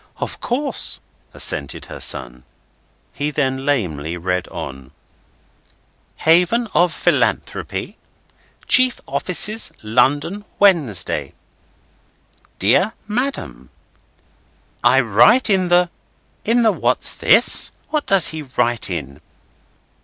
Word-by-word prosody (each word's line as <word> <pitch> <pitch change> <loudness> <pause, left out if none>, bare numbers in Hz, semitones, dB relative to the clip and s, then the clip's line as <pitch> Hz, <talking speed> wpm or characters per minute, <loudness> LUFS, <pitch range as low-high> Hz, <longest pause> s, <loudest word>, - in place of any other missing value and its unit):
"Of - - -6
course," 265 +2 -2 0.3
assented - - -1
her - - -10
son. 60 -1 -1 0.7
He 145 +2 -2
then 135 -2 -2
lamely 85 - -2
read 90 +1 -3
on: 65 -1 -8 1.3
"'Haven 180 +9 +2
of 175 +2 +3
Philanthropy, - - -2 0.7
Chief 255 -1 +5
Offices, 210 +4 0
London, 145 - 0
Wednesday. 115 - +1 1.2
"'DEAR 135 - +2
MADAM, 250 +6 -4 1.1
"'I - - +4
write 245 -3 +4
in 185 -2 +2
the—;' 175 0 +3 0.5
In 235 +2 +2
the 220 - +4
what's - - 0
this? - - +4 0.2
What 305 -2 -2
does 195 -3 +5
he 160 -1 -6
write 120 -5 -1
in?" 75 -5 -6
150 Hz, 95 wpm, -19 LUFS, -, 1.3 s, Chief